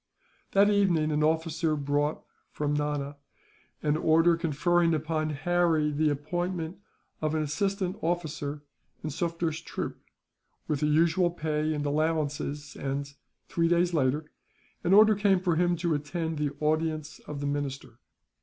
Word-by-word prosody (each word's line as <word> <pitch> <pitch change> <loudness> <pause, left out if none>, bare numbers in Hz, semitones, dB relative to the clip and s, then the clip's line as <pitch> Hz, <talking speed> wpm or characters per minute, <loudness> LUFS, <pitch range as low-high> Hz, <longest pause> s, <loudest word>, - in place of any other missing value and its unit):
That 200 +1 +5
evening 175 -7 +2
an 150 0 +1
officer 160 0 +1
brought, 145 +1 -1 0.3
from 145 -1 -1
Nana, 145 -1 -2 0.7
an 150 0 +2
order 165 +2 +4
conferring 165 +1 +2
upon 155 0 -1
Harry 160 0 +1
the 150 +1 +2
appointment 170 +4 -3 0.4
of 155 0 0
an 155 - +1
assistant 190 +5 -1
officer 150 -4 -2 0.4
in 155 - -3
Sufder's 165 +1 -2
troop, - - -5 0.7
with 150 - 0
the 150 - +1
usual 170 +4 +3
pay 155 -2 -1
and 145 0 -2
allowances 145 -1 -1
and, 140 +1 -3 0.3
three 165 -1 +1
days 175 +1 +2
later, 150 +1 0 0.5
an 180 +3 +4
order 215 +1 +8
came 200 -2 +3
for 180 -2 +1
him 175 +1 +2
to 170 -1 0
attend 160 +2 -3
the 150 -1 +1
audience 155 0 -1
of 150 -1 -5
the 145 - -3
minister. 135 -4 -4
155 Hz, 140 wpm, -28 LUFS, 150-170 Hz, 0.7 s, order